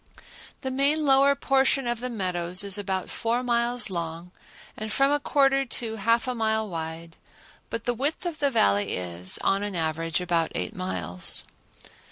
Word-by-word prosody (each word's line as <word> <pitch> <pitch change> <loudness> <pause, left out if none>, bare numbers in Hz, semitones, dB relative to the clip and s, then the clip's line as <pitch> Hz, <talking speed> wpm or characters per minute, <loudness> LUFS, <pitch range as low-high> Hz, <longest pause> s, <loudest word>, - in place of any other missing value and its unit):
The 265 - -3
main 285 +4 +1
lower 275 0 +5
portion 270 -1 +2
of 240 -1 -1
the 250 +1 -4
meadows 180 -4 -1
is 200 -2 +1
about 190 -2 -3
four 235 +2 -1
miles 240 -2 +4
long 170 0 -5 0.4
and 215 0 -5
from 275 +4 +2
a 290 - +2
quarter 275 -1 +2
to 235 -3 -3
half 230 +4 +1
a 255 - -1
mile 220 -2 0
wide, 165 -1 -6 0.5
but 230 - -4
the 245 - 0
width 285 +9 -2
of 335 -3 -4
the 285 - +2
Valley 100 - +2
is, 90 0 0
on 195 +1 +1
an 205 -2 -4
average, 165 0 -1
about 170 -2 0
eight 90 - -2
miles. 90 -1 0
220 Hz, 170 wpm, -25 LUFS, 165-265 Hz, 0.5 s, lower